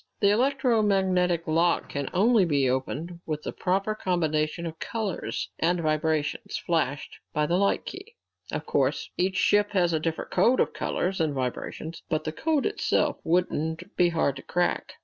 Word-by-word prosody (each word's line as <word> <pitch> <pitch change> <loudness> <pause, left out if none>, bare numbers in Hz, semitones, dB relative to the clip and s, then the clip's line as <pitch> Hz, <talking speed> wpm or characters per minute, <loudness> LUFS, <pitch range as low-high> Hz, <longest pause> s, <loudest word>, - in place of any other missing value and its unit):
The 200 -1 +4
electromagnetic 205 - +2
lock 165 +2 +2
can 140 -2 -3
only 215 +3 +4
be 145 -6 +2
opened 150 +7 -2
with 155 -1 -3
the - - -3
proper 195 +3 0
combinations 165 -4 -1
of 160 0 -8
colors 220 -5 -3
and 175 +2 +2
vibrations 155 -2 -1
flashed 145 -5 -1 0.2
by 150 - +1
the 175 +4 +1
light 200 +1 +1
key. 405 +5 -9 0.4
Of - - -3
course - - 0
each 185 +1 0
ship 205 +2 +3
has 175 -3 +2
a 160 - +2
different 160 +1 -3
code 255 +2 +3
of - - +2
colors 185 0 -1
and 155 -3 0
vibrations, 135 +5 -4
but 155 -1 0
the 155 - -3
code 305 - 0
itself 420 - +1
wouldn't 165 -1 -1
be 175 -1 +4
hard 150 -5 0
to - - -7
crack. 175 0 -1
175 Hz, 165 wpm, -27 LUFS, 155-195 Hz, 0.4 s, The